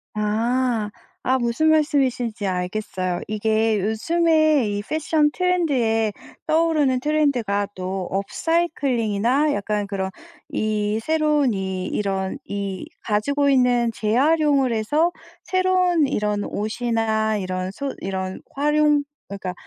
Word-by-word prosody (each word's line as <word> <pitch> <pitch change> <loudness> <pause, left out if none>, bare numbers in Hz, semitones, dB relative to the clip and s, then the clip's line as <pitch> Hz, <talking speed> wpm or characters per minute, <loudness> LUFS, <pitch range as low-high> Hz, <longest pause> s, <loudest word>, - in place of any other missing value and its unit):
아. 225 +1 0 0.4
아 260 +1 +3
무슨 240 +6 +1
말씀이신지 265 -8 +1
알겠어요. 185 -1 -2
이게 220 0 +1
요즘에 310 - +2
이 205 0 -2
패션 310 -1 +1
트렌드에 270 - +1 0.4
떠오르는 310 -5 +2
트렌드가 255 -9 +1
또 185 0 -4
업사이클링이나 260 - 0
약간 205 0 -2
그런 190 -1 -3 0.4
이 215 0 -1
새로운 300 -3 +2
이 190 -1 -3
이런 195 -2 -2
이 200 -2 -5 0.2
가지고 280 +7 +1
있는 245 -3 +3
재활용을 275 +3 +2
해서 295 +11 +1 0.3
새로운 365 -4 +2
이런 210 -3 -1
옷이나 220 0 -1
이런 185 -1 -3
소 275 +6 -4
이런 190 0 -4
활용 295 0 +3 0.3
그러니까 195 -2 -5
230 Hz, 255 characters per minute, -22 LUFS, 205-295 Hz, 0.4 s, 아